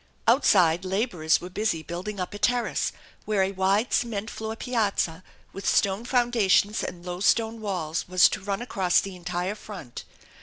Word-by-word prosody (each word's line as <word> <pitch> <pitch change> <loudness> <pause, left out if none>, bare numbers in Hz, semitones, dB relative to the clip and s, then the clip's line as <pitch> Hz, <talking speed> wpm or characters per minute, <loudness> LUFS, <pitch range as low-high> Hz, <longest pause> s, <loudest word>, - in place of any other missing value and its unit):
Outside 185 - +4
laborers 185 -5 +1
were 180 - -8
busy 185 -5 -1
building 185 +5 -5
up 180 +2 -4
a 205 - -7
terrace, 245 +2 +1 0.3
where 210 -3 +2
a 190 - 0
wide 195 +4 +1
cement 225 -2 -1
floor 220 0 -5
piazza 205 -8 -1 0.3
with 195 - -2
stone 200 +3 +1
foundations 230 -4 +2
and 175 0 -6
low 180 0 -5
stone 225 +3 +2
walls 175 -6 -3
was 185 0 +6
to - - -4
run 200 +3 -3
across 190 -7 +2
the 195 -1 -5
entire 180 +2 -3
front. 195 - -9
195 Hz, 160 wpm, -26 LUFS, 180-220 Hz, 0.3 s, was